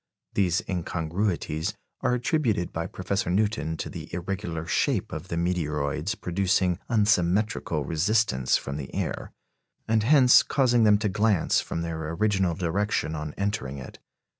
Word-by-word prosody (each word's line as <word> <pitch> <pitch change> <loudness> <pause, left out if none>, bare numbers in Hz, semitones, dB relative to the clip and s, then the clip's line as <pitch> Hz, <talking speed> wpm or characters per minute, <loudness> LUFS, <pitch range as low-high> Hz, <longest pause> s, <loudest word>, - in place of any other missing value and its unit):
These 95 0 +1
incongruities 85 -2 -2 0.3
are 125 - +2
attributed 120 - 0
by 85 0 -2
Professor 95 0 -2
Newton 95 -4 0
to - - -4
the - - -8
irregular 85 -2 -4
shape - - 0
of 80 +4 -6
the 85 - -3
meteoroids 80 +1 -1
producing 90 0 +1
unsymmetrical 100 -6 +1
resistance 80 - +2
from 70 +1 -5
the 70 -3 -6
air, - - -3 0.6
and 110 0 +2
hence 125 +1 +6
causing 120 -4 +2
them 105 -1 +6
to 105 +1 -1
glance 105 -2 +2
from 85 - -4
their 80 -2 -4
original 95 -2 +1
direction 90 0 -1
on 75 -1 -5
entering 100 -9 -2
it. 65 - -10
90 Hz, 140 wpm, -26 LUFS, 80-105 Hz, 0.6 s, hence